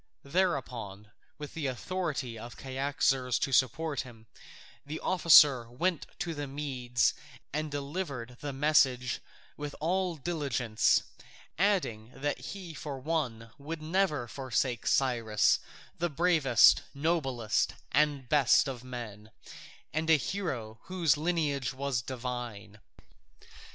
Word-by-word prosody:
Thereupon, 125 - -2 0.3
with 150 -1 -8
the 155 -4 -2
authority 135 -3 -3
of 120 +2 -9
Cyaxares 135 -2 0
to 135 - -1
support 140 +4 +2
him, 115 -3 -13 0.6
the 150 +3 -6
officer 150 -9 +6
went 170 +8 -1
to 170 - -3
the 145 -2 -4
Medes 130 -4 0 0.4
and 155 +1 -2
delivered 140 -4 -4
with 145 -2 -4
message 135 -4 +2 0.4
with 145 0 -5
all 180 +2 0
diligence, 130 -8 +1 0.6
adding 170 - +1
that 145 +2 -2
he 185 -5 -7
for 145 -1 -6
one 130 -6 -2
would 155 +2 -6
never 155 -6 +1
forsake 130 -1 -2
Cyrus, 115 -5 +3 0.4
the 175 +1 0
bravest, 155 -7 +5
noblest, 135 -8 0 0.2
and 145 -3 +2
best 140 0 +4
of 125 -3 -5
men, 115 -4 -8 0.6
and 160 +2 -1
a 160 - +7
hero 130 - -4
whose 175 -6 +2
lineage 150 -5 -1
was 135 -2 -1
divine. 120 -4 -6
140 Hz, 115 wpm, -30 LUFS, 120-155 Hz, 0.6 s, a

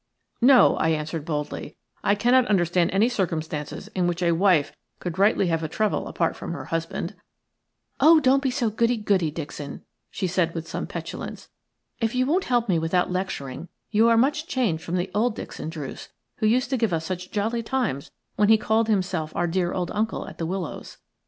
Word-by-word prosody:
"No," 255 0 +6
I 160 - +2
answered, 155 0 -2
boldly, 150 -1 -4 0.3
"I 200 - +3
cannot 245 +4 +4
understand 175 -3 +2
any 200 +4 +3
circumstances 160 -9 -3
in 180 -2 0
which 175 0 -1
a 170 - +3
wife 170 -3 +3 0.2
could 175 0 -5
rightly 200 0 +4
have 165 -1 0
a 160 - -2
trouble 215 +6 -1
apart 165 - -1
from - - -6
her - - -6
husband." 165 0 -3 0.9
"Oh, 315 +4 +7
don't 270 -1 +3
be 270 - +1
so 245 -4 0
goody 230 +2 +1
goody, 200 -6 +1
Dixon," 145 -2 -7 0.3
she - - -3
said, 175 -2 0
with 165 -1 -4
some - - -4
petulance. - - -7 0.5
"If 225 0 -1
you 255 0 +2
won't 345 +7 +1
help 240 -2 +1
me 175 -5 +2
without 175 +3 +1
lecturing, 180 -5 -4 0.2
you 225 +2 +4
are 230 - +4
much 295 +6 +2
changed 215 -12 0
from 170 +2 -3
the 185 +1 -1
old 220 +2 +1
Dixon 160 - -6
Druce 150 -5 -7 0.3
who 215 - +1
used 245 +3 +2
to 265 - +2
give 225 -6 +1
us 160 -1 -1
such 180 +1 -4
jolly 220 +3 -1
times 230 - -2 0.3
when 210 0 +3
he 220 - +7
called, 220 +1 +1
himself 185 -7 0
our 175 - +1
dear 175 +1 0
old 180 -2 -2
uncle 220 +1 -2
at - - -11
The 165 - -2
Willows. 180 -2 -5
190 Hz, 195 wpm, -25 LUFS, 165-230 Hz, 0.9 s, Oh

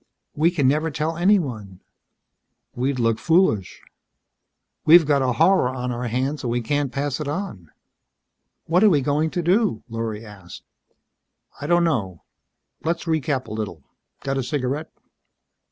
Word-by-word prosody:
"We 155 +3 +3
can 155 -7 +1
never 155 +4 +1
tell 155 +2 -2
anyone." 135 - 0 0.9
"We'd 130 +2 -1
look 115 -2 +1
foolish." 160 - +1 1.0
"We've 165 +1 +7
got 145 -2 +2
a 130 -1 +1
horror 155 +2 +3
on 125 -1 -4
our 120 0 -3
hands 130 +5 -2
and 120 - -2
we 120 +1 0
can't 145 +2 -1
pass 140 0 -2
it 150 - -4
on." 145 - -5 1.0
"What 175 +5 +2
are 215 - +7
we 150 -7 +3
going 150 +4 0
to 175 +1 -3
do?" 185 - +1
Lorry 115 -1 -5
asked. 100 -4 -12 1.0
"I 145 - -4
don't 175 +1 +3
know. 105 - -1 0.6
Let's 170 +1 -1
recap 155 -5 -1
a - - -8
little. 105 -9 -5 0.4
Got 135 0 -2
a - - -1
cigarette?" 140 +4 -2
140 Hz, 150 wpm, -22 LUFS, 120-160 Hz, 1.0 s, We've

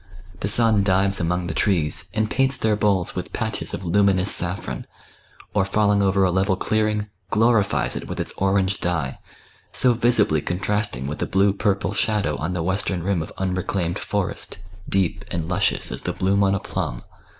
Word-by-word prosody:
The - - -2
sun 110 0 +4
dives 95 0 +2
among 90 +1 -1
Ihe 85 - -3
trees, 85 -7 +1
and 110 0 +1
paints 135 +3 +1
their 110 -3 +1
boles 100 -4 +1
with - - -5
patches - - -2
of 90 - -8
luminous 95 +1 +3
saflFron, 85 -8 -1 0.7
or 100 - +3
falling 100 +1 +2
over 100 0 +3
a 95 - +3
level 95 +1 +2
clearing, 105 +1 0 0.2
glorifies 110 -2 +2
it - - -5
with - - -5
its - - -1
orange 95 -1 +1
dye, 80 -7 -2 0.5
so 125 -1 +4
visibly 115 -10 +2
contrasting 95 - -1
with 75 +2 -4
the - - -1
blue 100 +1 +3
purple 100 0 0
shadow 105 0 0
on 80 +4 -3
the 85 -2 -2
western 95 -1 -1
rim 95 -2 0
of 80 - -6
unreclaimed 95 -2 -1
forest, - - -3 0.3
deep 95 -3 0
and 80 -2 -3
luscious 95 +3 0
as - - -5
the - - -3
bloom 100 +2 +1
on 100 0 +3
a - - -1
plum. - - -4
95 Hz, 175 wpm, -23 LUFS, 90-105 Hz, 0.7 s, sun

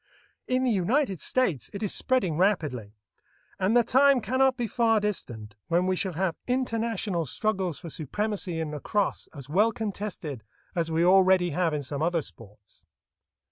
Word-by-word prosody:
In 255 0 +1
the 255 - +2
United 205 - +1
States 185 - 0
it 200 - -5
is 205 - -1
spreading 245 - +1
rapidly, 150 - 0 0.6
and 200 +5 +3
the 240 - +5
time 270 +3 +4
cannot 260 +4 +2
be 240 - -1
far 225 0 +2
distant 120 - -4
when 175 +2 +2
we 185 0 +1
shall 185 0 -2
have 175 0 -1
international 225 - -1
struggles 190 - -1
for 165 - -9
supremacy 185 - -3
in 160 -2 -3
lacrosse 195 +7 -2
as 140 -4 -10
well 205 +9 +3
contested 200 - -5 0.3
as 165 -2 -1
we 165 +1 +2
already 185 -1 +5
have 170 +2 +1
in 150 -1 -2
some 140 +2 -4
other 165 -1 +1
sports. 105 -4 -13
185 Hz, 160 wpm, -27 LUFS, 160-225 Hz, 0.6 s, the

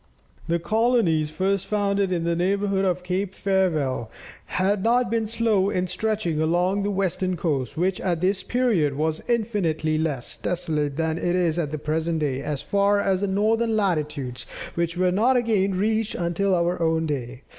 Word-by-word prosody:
The 170 0 +2
colonies 215 -6 +2
first 190 +4 -1
founded 200 -2 0
in 170 -2 0
the 170 0 0
neighbourhood 195 +2 +1
of 180 -1 0
Cape 190 +1 -2
Farewell, 155 - 0 0.4
had 190 +1 0
not 240 +1 +2
been 225 -1 0
slow 220 -3 +1
in 180 -2 0
stretching 185 -4 -1
along 175 +5 +1
the 200 - -1
western 185 -2 -1
coast, 140 -8 -2
which 185 +2 0
at 175 -3 0
this 190 +3 +1
period 215 - +1
was 155 +2 -1
infinitely 175 -10 0
less 145 -6 -2
desolate 155 -5 -2
than 160 0 -1
it 175 0 0
is 175 -2 +1
at 155 -4 -1
the 155 - -4
present 160 +2 -1
day, 140 -4 -1
as 145 -2 -4
far 200 0 +2
as 195 -2 +1
northern 220 +3 +1
latitudes, 150 - -2 0.3
which 170 0 -2
were 180 0 +2
not 235 +7 +3
again 200 -5 +1
reached 220 +2 0
until 180 +3 0
our 175 0 0
own 160 0 +1
day. 130 -3 -4
180 Hz, 165 wpm, -24 LUFS, 160-200 Hz, 0.4 s, not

